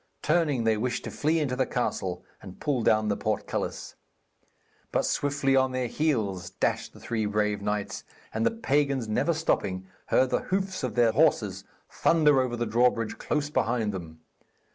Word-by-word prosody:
Turning, 150 Hz, -6 st, +2 dB
they 110 Hz, -1 st, +2 dB
wished 125 Hz, +3 st, -2 dB
to -, -, -5 dB
flee 155 Hz, +3 st, +1 dB
into 145 Hz, -5 st, 0 dB
the 130 Hz, -, +2 dB
castle -, -, -2 dB, 0.2 s
and 95 Hz, -, -11 dB
pull 140 Hz, -5 st, 0 dB
down 110 Hz, -1 st, +3 dB
the 105 Hz, -, +1 dB
portcullis. -, -, -3 dB, 1.0 s
But -, -, +1 dB
swiftly 140 Hz, -1 st, +1 dB
on 130 Hz, -1 st, +3 dB
their 130 Hz, 0 st, -1 dB
heels 110 Hz, -, -1 dB
dashed 95 Hz, -, -1 dB
the -, -, -14 dB
three 110 Hz, -2 st, -2 dB
brave 105 Hz, 0 st, 0 dB
knights, 105 Hz, 0 st, -3 dB, 0.3 s
and 110 Hz, -, -1 dB
the -, -, +4 dB
pagans, 140 Hz, -, 0 dB
never 110 Hz, +10 st, +1 dB
stopping, 95 Hz, -, -1 dB, 0.2 s
heard 130 Hz, 0 st, +3 dB
the -, -, +2 dB
hoofs 190 Hz, 0 st, -1 dB
of 130 Hz, -, -3 dB
their 120 Hz, -2 st, +4 dB
horses 105 Hz, -, +2 dB, 0.2 s
thunder 150 Hz, -5 st, +3 dB
over 125 Hz, -2 st, -1 dB
the 120 Hz, 0 st, -1 dB
drawbridge 115 Hz, 0 st, +1 dB
close 150 Hz, -1 st, -1 dB
behind 115 Hz, -7 st, 0 dB
them. 80 Hz, -4 st, -8 dB
125 Hz, 165 wpm, -27 LUFS, 105-145 Hz, 1.0 s, the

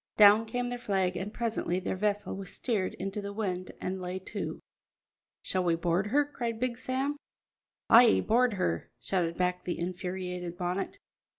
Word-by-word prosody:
Down 210 Hz, +2 st, +8 dB
came 245 Hz, +2 st, -2 dB
their 245 Hz, 0 st, -4 dB
flag, 190 Hz, -5 st, 0 dB
and 190 Hz, +4 st, -3 dB
presently 220 Hz, -6 st, -1 dB
their 190 Hz, -, -2 dB
vessel 205 Hz, 0 st, -1 dB
was 195 Hz, -1 st, -6 dB
steered 210 Hz, -7 st, -1 dB
into 195 Hz, +2 st, -4 dB
the 200 Hz, 0 st, -5 dB
wind 185 Hz, -4 st, -3 dB
and 185 Hz, 0 st, -3 dB
lay 180 Hz, +1 st, -3 dB, 0.2 s
to. -, -, -3 dB, 0.8 s
"Shall 185 Hz, -1 st, 0 dB
we 170 Hz, -2 st, +3 dB
board 175 Hz, +3 st, +1 dB
her?" 290 Hz, +7 st, +3 dB
cried 235 Hz, -6 st, -4 dB
Big 245 Hz, -1 st, -1 dB
Sam. 265 Hz, +3 st, -1 dB, 0.7 s
"Ay, 235 Hz, 0 st, +7 dB
board 240 Hz, +1 st, +3 dB
her!" 85 Hz, -, -1 dB
shouted 170 Hz, -3 st, -1 dB
back 180 Hz, 0 st, 0 dB
the 175 Hz, -, -2 dB
infuriated 180 Hz, 0 st, -4 dB
Bonnet. 180 Hz, -, -2 dB
195 Hz, 165 wpm, -30 LUFS, 180-230 Hz, 0.8 s, Down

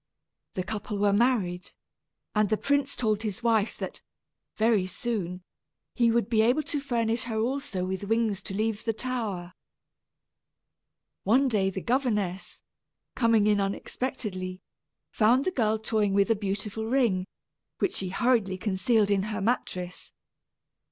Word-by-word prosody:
The 185 Hz, -, -1 dB
couple 210 Hz, +1 st, -4 dB
were 200 Hz, 0 st, +3 dB
married, 200 Hz, -6 st, +1 dB, 0.6 s
and 210 Hz, -2 st, +2 dB
the 215 Hz, -, +2 dB
prince 280 Hz, +2 st, +1 dB
told 215 Hz, -3 st, 0 dB
his 215 Hz, -1 st, -4 dB
wife 225 Hz, -2 st, +2 dB
that, -, -, -5 dB, 0.6 s
very 220 Hz, -4 st, +3 dB
soon, 185 Hz, -3 st, -3 dB, 0.5 s
he 235 Hz, -2 st, +3 dB
would 230 Hz, -3 st, +2 dB
be 225 Hz, -2 st, +3 dB
able 250 Hz, +7 st, +3 dB
to 295 Hz, 0 st, -2 dB
furnish 235 Hz, -3 st, -1 dB
her 225 Hz, -2 st, -3 dB
also 235 Hz, -6 st, -1 dB
with 190 Hz, +1 st, -3 dB
wings 225 Hz, -2 st, +1 dB
to 195 Hz, -, -6 dB
leave 215 Hz, 0 st, -1 dB
the 225 Hz, -, 0 dB
tower. 215 Hz, -8 st, -3 dB, 1.7 s
One 255 Hz, +7 st, +4 dB
day 205 Hz, -6 st, +2 dB
the 190 Hz, 0 st, -5 dB
governess, 210 Hz, -7 st, -1 dB, 0.5 s
coming 230 Hz, -3 st, +3 dB
in 210 Hz, -1 st, +3 dB
unexpectedly, 195 Hz, -2 st, -3 dB, 0.5 s
found 240 Hz, +5 st, +3 dB
the 370 Hz, -, +1 dB
girl 220 Hz, -8 st, +1 dB
toying 215 Hz, -2 st, 0 dB
with 200 Hz, +3 st, +3 dB
a -, -, +4 dB
beautiful 205 Hz, +2 st, -3 dB
ring, 225 Hz, -8 st, +2 dB, 0.5 s
which 380 Hz, -, 0 dB
she 190 Hz, -, -1 dB
hurriedly 220 Hz, -3 st, +1 dB
concealed 205 Hz, +2 st, +2 dB
in 200 Hz, -1 st, +3 dB
her 210 Hz, -1 st, -3 dB
mattress. 185 Hz, -5 st, -2 dB
215 Hz, 140 wpm, -27 LUFS, 195-235 Hz, 1.7 s, One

